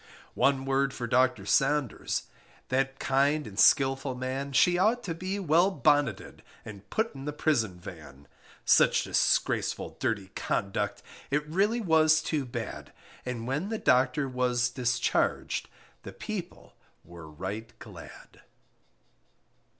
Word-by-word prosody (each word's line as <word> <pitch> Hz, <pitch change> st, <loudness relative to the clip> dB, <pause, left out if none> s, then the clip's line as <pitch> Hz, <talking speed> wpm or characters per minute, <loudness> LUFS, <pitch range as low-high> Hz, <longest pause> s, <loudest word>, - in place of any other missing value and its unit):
One 135 Hz, -1 st, +2 dB
word 135 Hz, 0 st, 0 dB
for 120 Hz, -, -4 dB
Docter 125 Hz, -4 st, +2 dB
Saunders 135 Hz, +2 st, 0 dB, 0.5 s
That 135 Hz, +1 st, 0 dB
kind 140 Hz, +3 st, +1 dB
and 105 Hz, -1 st, -7 dB
skilful 135 Hz, -1 st, +4 dB
man 130 Hz, +2 st, -4 dB
She 175 Hz, +6 st, +4 dB
ought 225 Hz, +5 st, +2 dB
to 170 Hz, -, -3 dB
be 185 Hz, +4 st, -4 dB
well 175 Hz, 0 st, +3 dB
bonneted 145 Hz, -6 st, 0 dB, 0.2 s
And 100 Hz, -2 st, -11 dB
put 220 Hz, +1 st, -1 dB
in 135 Hz, -1 st, -9 dB
the 150 Hz, -, -2 dB
prison 120 Hz, -, 0 dB
van; 75 Hz, -6 st, -12 dB, 0.4 s
Such -, -, +4 dB
disgraceful -, -, 0 dB
dirty 100 Hz, -4 st, -2 dB
conduct 100 Hz, +1 st, -2 dB, 0.3 s
It 150 Hz, +2 st, 0 dB
really 200 Hz, +9 st, +1 dB
was 160 Hz, -4 st, +4 dB
too 150 Hz, -4 st, -1 dB
bad, 120 Hz, -, -6 dB, 0.4 s
And 120 Hz, -2 st, -4 dB
when 145 Hz, -, -2 dB
the 225 Hz, -, -2 dB
Docter 130 Hz, -2 st, +2 dB
was 125 Hz, -1 st, 0 dB
discharged 125 Hz, -1 st, -1 dB, 0.3 s
The -, -, -9 dB
people -, -, -7 dB, 0.3 s
were 85 Hz, -2 st, -11 dB
right 95 Hz, +8 st, -6 dB
glad. -, -, -13 dB
135 Hz, 125 wpm, -28 LUFS, 115-150 Hz, 0.5 s, skilful